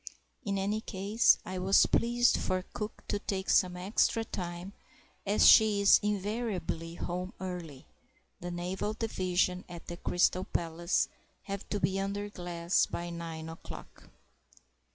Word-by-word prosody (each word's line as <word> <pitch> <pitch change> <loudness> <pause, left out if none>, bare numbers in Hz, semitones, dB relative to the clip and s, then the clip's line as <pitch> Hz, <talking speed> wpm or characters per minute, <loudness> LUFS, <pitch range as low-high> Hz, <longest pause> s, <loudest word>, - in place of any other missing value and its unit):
In 200 -4 -1
any 205 +3 -1
case, 205 +2 +3
I 185 0 -4
was 190 +2 +5
pleased 240 +1 +3
for 185 0 -1
cook 210 +1 -6
to 205 - -1
take 195 -2 -2
some 180 -2 +3
extra 210 +4 +1
time, 175 0 -6 0.5
as 205 +2 +5
she 215 -2 +7
is 200 - +7
invariably 200 -5 -2
home 180 +2 -4
early—the 175 -1 -9
Naval 180 +4 -3
Division 185 -4 0
at 175 -1 -9
the 175 - -7
Crystal 180 +1 +1
Palace 170 +1 0 0.4
have 200 -1 -6
to 205 - -1
be 195 0 0
under 200 +1 -3
glass 175 -1 0
by 175 0 -5
nine 165 -1 -6
o'clock. 165 0 -11
185 Hz, 135 wpm, -31 LUFS, 175-205 Hz, 0.5 s, she